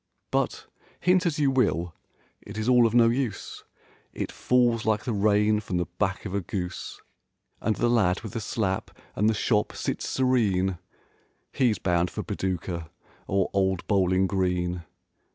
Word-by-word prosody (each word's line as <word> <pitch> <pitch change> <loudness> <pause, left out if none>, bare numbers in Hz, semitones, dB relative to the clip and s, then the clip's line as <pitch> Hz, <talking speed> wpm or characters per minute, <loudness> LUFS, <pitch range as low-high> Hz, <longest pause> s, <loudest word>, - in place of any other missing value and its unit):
But - - -1 0.3
hint 180 0 +3
as 160 - -1
you 145 -3 +3
will, 90 -10 +1 0.5
it 100 - -10
is 110 +1 -2
all 125 -2 +6
of 115 - -3
no 120 -1 +6
use; 120 -2 -2 0.5
It - - -4
falls 120 -3 +2
like 110 -1 +1
the 120 - -2
rain 105 +1 +3
from 100 -4 -3
the 90 - 0
back 95 -1 -1
of 95 - -5
a 100 - 0
goose. 90 0 -5 0.6
And 110 - +1
the 120 - +1
lad 105 -6 +2
with 110 -4 -8
the 115 - -3
slap 100 -3 -2 0.3
and 105 +3 +3
the 110 - +1
shop 105 0 +1
sits - - -3
serene: 100 -9 +1 0.7
He's 120 -6 +2
bound 90 -1 +1
for - - -5
Paducah 85 -3 -3 0.4
or 95 -1 +1
old 95 -2 +1
Bowling 95 -2 +2
Green. 90 -2 -1
105 Hz, 160 wpm, -26 LUFS, 95-115 Hz, 0.7 s, all